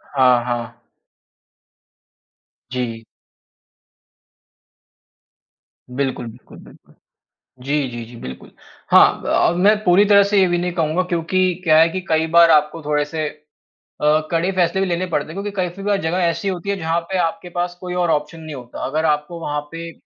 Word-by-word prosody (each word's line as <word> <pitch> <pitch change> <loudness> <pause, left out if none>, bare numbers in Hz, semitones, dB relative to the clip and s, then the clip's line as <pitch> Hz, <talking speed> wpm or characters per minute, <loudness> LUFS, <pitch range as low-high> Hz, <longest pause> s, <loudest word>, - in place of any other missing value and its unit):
हाँ, 125 -2 +4
हाँ। 120 -2 -4 1.9
जी। 115 -3 -4 2.9
बिल्कुल, 135 -3 -2
बिल्कुल, 115 +2 -13
बिल्कुल। - - -19 0.7
जी, 140 0 0
जी, 120 -1 -7
जी, 120 +1 -13
बिल्कुल। 65 0 -9 0.4
हाँ - - +6 0.3
अ, - - +1
मैं 200 +4 +4
पूरी 185 +3 +5
तरह 200 -1 +6
से 200 0 +2
ये 190 - +4
भी 175 0 0
नहीं 180 +1 -2
कहूँगा 165 +1 0
क्योंकि 180 +1 0
क्या 155 -2 +5
है 165 +1 +5
कि 185 +2 -4
कई 160 0 +2
बार 170 -1 +8
आपको 150 +1 +2
थोड़े 150 0 0
से 155 0 -3 0.7
अ, 150 +1 +4
कड़े 170 +3 +1
फैसले 185 +1 +1
भी 195 - 0
लेने 175 +1 -1
पड़ते 170 - -1
हैं - - -9
क्योंकि 200 +1 -4
कई-कई 185 +1 -3
बार 205 -1 +1
जगह 160 +3 -1
ऐसी 170 +4 -1
होती 190 +1 -3
है 200 - +1
जहाँ 165 0 -1
पे 190 - 0
आपके 175 +1 -2
पास 175 0 -3
कोई 180 -1 -5
और 175 -2 0
ऑप्शन 150 +2 -2
नहीं 155 -2 -8
होता, 125 -2 -10
अगर 155 +4 -1
आपको 150 +3 -1
वहाँ 150 -2 -3
पे 165 0 -7
165 Hz, 170 wpm, -20 LUFS, 150-180 Hz, 2.9 s, बार